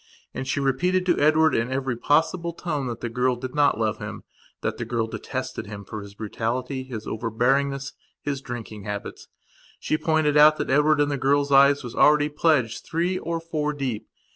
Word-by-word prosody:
And 130 - -5
she 135 - 0
repeated 180 +8 +1
to 175 -2 +2
Edward 155 +1 +4
in 115 +3 0
every 130 -1 -1
possible 165 +7 +1
tone 150 -6 -3
that 120 -1 -5
the - - -2
girl 125 +2 0
did 125 +1 -7
not 145 -6 +3
love 110 -1 0
him; - - -7 0.4
that - - -2
the - - -2
girl 115 0 -1
detested 110 - -5
him 100 -1 -8
for 110 +2 -6
his 100 0 -11
brutality, 120 +5 -3
his 120 -5 -7
overbearingness, 135 +5 0 0.3
his 140 -2 -3
drinking 115 -5 -7
habits. 105 -1 -6 0.5
She 155 - -1
pointed 155 -2 +1
out 155 +1 +7
that - - -2
Edward 150 +2 +4
in 145 - +2
the 140 - -1
girl's 140 +1 +2
eyes, 140 +1 +5
was 120 -1 -7
already 150 0 +4
pledged 145 -7 +1
three 175 +3 -1
or 170 0 -3
four 155 -2 -2
deep. 125 -7 -4
135 Hz, 190 wpm, -24 LUFS, 120-150 Hz, 0.5 s, out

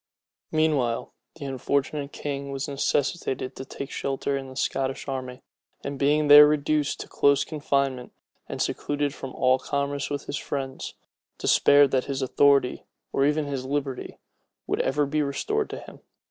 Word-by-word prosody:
Meanwhile, 150 -7 +1 0.2
the 155 -3 -8
unfortunate 140 +2 -1
king 140 -1 -4
was 135 0 -3
necessitated 140 -1 -1
to - - -6
take 135 +1 -7
shelter 140 0 -2
in 135 -1 -5
the 130 - -11
Scottish 135 +1 -2
army; 130 -1 -5 0.4
and 140 -1 -5
being 150 +2 +3
there 145 0 +10
reduced 150 -1 0
to - - -8
close 140 -1 +3
confinement, 140 -4 -1 0.4
and - - -1
secluded 145 -1 -2
from 135 -3 -7
all 130 0 +3
commerce 140 0 -2
with 145 -1 -4
his 145 - -3
friends, 135 -2 -5 0.4
despaired 145 -1 +5
that 130 -1 +1
his 135 -1 -2
authority, 140 0 +3 0.3
or 135 - +3
even 150 0 +1
his 140 -2 -3
liberty, 135 -1 -3 0.5
would - - 0
ever 145 +2 +1
be 155 +2 0
restored 420 - -1
to - - -5
him. - - -12
140 Hz, 155 wpm, -26 LUFS, 135-145 Hz, 0.5 s, there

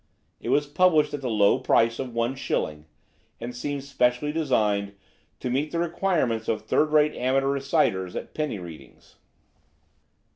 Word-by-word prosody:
It - - -6
was 145 - +3
published 155 +1 +3
at 145 - -4
the 130 - -2
low 105 +2 +3
price 115 -2 +2
of 130 -3 -5
one 115 +2 0
shilling, 75 - -3 0.5
and 120 +1 -6
seemed 140 +2 -4
specially 130 +1 +1
designed 105 -10 0 0.5
to 125 - -2
meet 140 +4 0
the 170 - -2
requirements 170 -9 0
of 110 - -1
third 155 - +2
rate 150 0 +4
amateur 135 +2 +1
reciters 140 - 0
at - - -6
penny 150 -8 -2
readings. 85 -4 -12
130 Hz, 150 wpm, -25 LUFS, 115-150 Hz, 0.5 s, rate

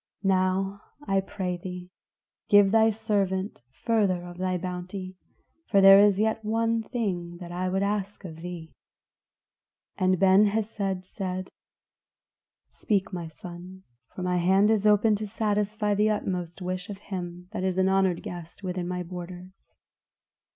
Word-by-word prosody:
Now, 190 +1 +1 0.3
I 195 0 +2
pray 190 -2 -4
thee, 180 0 -8 0.6
give 205 -2 +6
thy 225 0 +5
servant 205 -3 -1 0.2
further 200 -6 +2
of 175 0 -10
thy 185 -1 0
bounty; 185 +1 -6 0.5
for 200 - +4
there 195 0 +9
is 205 -1 +5
yet 220 +1 +1
one 225 +1 +1
thing 185 -8 -3
that 175 -1 -9
I 180 +1 -2
would 190 +1 0
ask 200 0 -2
of 160 -3 -8
thee." 170 -1 -8 1.3
And 185 0 +3
Ben 195 +3 +5
Hesed 200 -3 -2
said, 185 -1 -5 1.2
"Speak, 200 -3 -1
my 175 -2 -4
son, 180 +3 -10 0.3
for 185 - -5
my 180 0 +1
hand 190 +4 +4
is 215 -1 +2
open 210 +1 +5
to 215 +1 -4
satisfy 210 0 0
the 210 +1 +2
utmost 180 -4 -3
wish 180 +1 -4
of 200 - -6
him 180 -3 -7
that - - -4
is 190 -1 0
an 190 0 +3
honored 190 -2 +2
guest 175 +2 -8
within 180 -1 -3
my 180 0 -3
borders." 180 +1 -10
190 Hz, 145 wpm, -27 LUFS, 180-205 Hz, 1.3 s, there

